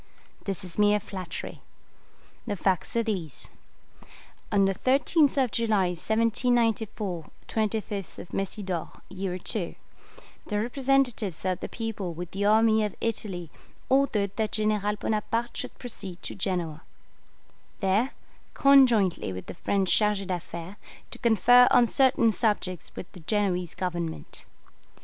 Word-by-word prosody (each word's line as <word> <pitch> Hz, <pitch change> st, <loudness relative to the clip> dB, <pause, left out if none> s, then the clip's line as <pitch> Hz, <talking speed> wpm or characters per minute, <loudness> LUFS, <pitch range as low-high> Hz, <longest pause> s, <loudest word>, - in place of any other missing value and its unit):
This 195 Hz, -3 st, -3 dB
is 180 Hz, +1 st, -8 dB
mere 210 Hz, 0 st, +5 dB
flattery. 190 Hz, -3 st, -7 dB, 0.9 s
The 205 Hz, -, -1 dB
facts 190 Hz, -, 0 dB
are 230 Hz, -, +2 dB
these: 180 Hz, -, -3 dB, 1.0 s
On 200 Hz, -1 st, +4 dB
the 195 Hz, -, +2 dB
13th 280 Hz, -, +3 dB
of 260 Hz, -4 st, +2 dB
July 215 Hz, -5 st, +2 dB
1794 220 Hz, -2 st, 0 dB, 0.2 s
(25th 210 Hz, -5 st, -3 dB
Messidor, 190 Hz, -3 st, -2 dB, 0.2 s
year 190 Hz, 0 st, -3 dB, 0.2 s
II), 180 Hz, -6 st, -3 dB, 0.7 s
the 210 Hz, -1 st, -1 dB
representatives 245 Hz, -, +1 dB
of 185 Hz, -1 st, 0 dB
the -, -, -5 dB
people 215 Hz, -6 st, -4 dB
with 175 Hz, +1 st, -6 dB
the 200 Hz, +1 st, -2 dB
army 220 Hz, +1 st, +4 dB
of 210 Hz, -2 st, -2 dB
Italy 190 Hz, -7 st, -3 dB, 0.4 s
ordered 225 Hz, -8 st, +2 dB
that 220 Hz, -1 st, -1 dB
General 210 Hz, -1 st, +1 dB
Bonaparte 225 Hz, +3 st, -2 dB
should 255 Hz, -, -4 dB
proceed 195 Hz, -7 st, -6 dB
to -, -, -5 dB
Genoa, 175 Hz, -5 st, -2 dB, 1.0 s
there, 205 Hz, +6 st, +1 dB, 0.4 s
conjointly 245 Hz, -, +5 dB
with 95 Hz, 0 st, -6 dB
the -, -, -7 dB
French 190 Hz, +2 st, 0 dB
'chargé 210 Hz, -2 st, +3 dB
d'affaires', 175 Hz, 0 st, -5 dB, 0.3 s
to -, -, -6 dB
confer 245 Hz, +2 st, +6 dB
on 245 Hz, -, +6 dB
certain 250 Hz, -2 st, +3 dB
subjects 205 Hz, -6 st, -1 dB
with 180 Hz, -, -8 dB
the 180 Hz, -, -12 dB
Genoese 180 Hz, -1 st, -1 dB
Government. 170 Hz, -3 st, -3 dB
205 Hz, 125 wpm, -27 LUFS, 185-230 Hz, 1.0 s, confer